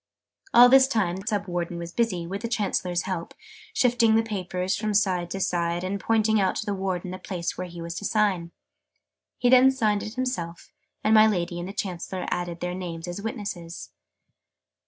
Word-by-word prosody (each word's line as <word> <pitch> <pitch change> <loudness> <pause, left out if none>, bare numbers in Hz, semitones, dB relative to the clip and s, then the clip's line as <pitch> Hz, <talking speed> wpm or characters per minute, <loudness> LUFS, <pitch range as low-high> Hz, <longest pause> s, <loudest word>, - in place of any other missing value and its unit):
All 245 +1 +9
this 265 +1 +7
time 200 -9 0
the 195 +2 -10
Sub 205 -2 0
Warden 175 -1 -3
was 170 0 -6
busy, 185 -6 0
with 195 +4 -5
the 230 - -2
Chancellor's 195 -6 -1
help, 185 -3 -4 0.4
shifting 240 - +3
the 225 - +4
papers 185 -3 -2
from 215 -1 -2
side 185 -4 +1
to 195 - -4
side, 175 -1 0
and 195 +2 -2
pointing 220 0 +2
out 190 - +1
to - - -3
the 205 - -1
Warden 190 -2 -3
the 185 - -6
place 180 -2 -4
whew 185 - -4
he 170 -1 -8
was 170 0 -5
to 205 - -7
sign. 195 -6 +1 0.9
He 245 - +1
then 255 +1 +7
signed 215 -6 +1
it 215 +1 -7
himself, 250 -10 -4 0.3
and 215 - +3
my 215 0 +8
Lady 175 -4 -1
and 175 +2 -5
the - - -4
Chancellor 185 -1 -4
added 175 -1 -3
their 180 0 -2
names 175 -2 -6
as 175 +3 -5
witnesses. 200 -7 -6
190 Hz, 195 wpm, -26 LUFS, 175-220 Hz, 0.9 s, All